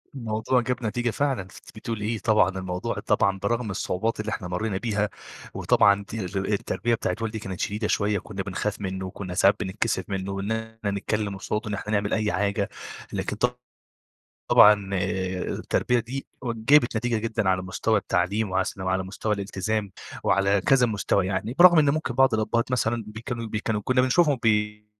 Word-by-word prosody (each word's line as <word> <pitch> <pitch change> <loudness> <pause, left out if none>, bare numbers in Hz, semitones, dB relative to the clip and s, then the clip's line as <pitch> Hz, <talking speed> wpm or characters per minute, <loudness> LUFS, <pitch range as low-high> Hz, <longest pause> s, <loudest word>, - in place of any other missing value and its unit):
الموضوع 115 +1 0
جاب 125 +1 -3
نتيجة 120 +3 0
فعلًا 135 -2 0
أنتِ 95 - -12 0.2
بتقولي 110 -3 -4
إيه؟! 110 0 -1
طبعًا 105 -1 +3
الموضوع 95 -1 -3
طبعًا 100 -1 +1
برغم 110 +2 -1
الصعوبات 100 +4 -2
اللي 110 0 -3
إحنا 95 -3 -4
مرّينا 95 +3 -2
بيها 105 0 -1 0.4
وطبعًا 100 0 +3
تي 110 -3 -4
ال 95 +2 -2
التربية 115 +3 0
بتاعة - - -2
والدي 110 -1 -3
كانت 95 -3 -6
شديدة 105 +1 -1
شويّة 105 0 +1
وكنّا 95 0 -5
بنخاف 100 +2 -3
منُّه 95 -1 -3
وكنّا 95 0 -6
ساعات 100 +2 +4
بنتكسف 100 +4 -1
منُّه 95 0 -3
وإن 100 +2 -3
إحنا 110 -1 -3
نتكلّم 100 0 -2
قصاده، 105 +2 -3
إن - - -3
إحنا 105 +1 -4
نعمل 100 -1 0
أي 110 -1 +1
حاجة، 100 +3 0 0.4
لكن 105 - -2
ط 125 +2 0 0.9
طبعًا 105 -2 +6
التربية 95 +6 -1
دي 125 +4 -5 0.2
جابت 120 +2 +3
نتيجة 120 0 0
جدًا 110 -2 -1
على 95 0 +2
مستوى 105 +4 0
التعليم 95 +3 0
وعس 95 +1 -1
وعلى 95 0 0
مستوى 100 +3 -2
الإلتزام 100 +1 -3 0.3
وعلى 100 +1 +3
كذا 125 +5 +4
مستوى 100 -3 0
يعني، 100 +5 -2
برغم 175 -1 +8
إن 145 -2 +5
ممكن 150 -4 -2
بعض 135 -1 +4
الأبهات 115 +3 0
مثلًا 115 -2 0
بيكانوا 115 +2 -5
بيكانوا 110 0 -2
كنّا 130 0 +3
بنشوفهم 140 +2 +3
بي 105 -1 +1
105 Hz, 170 wpm, -25 LUFS, 95-115 Hz, 0.9 s, برغم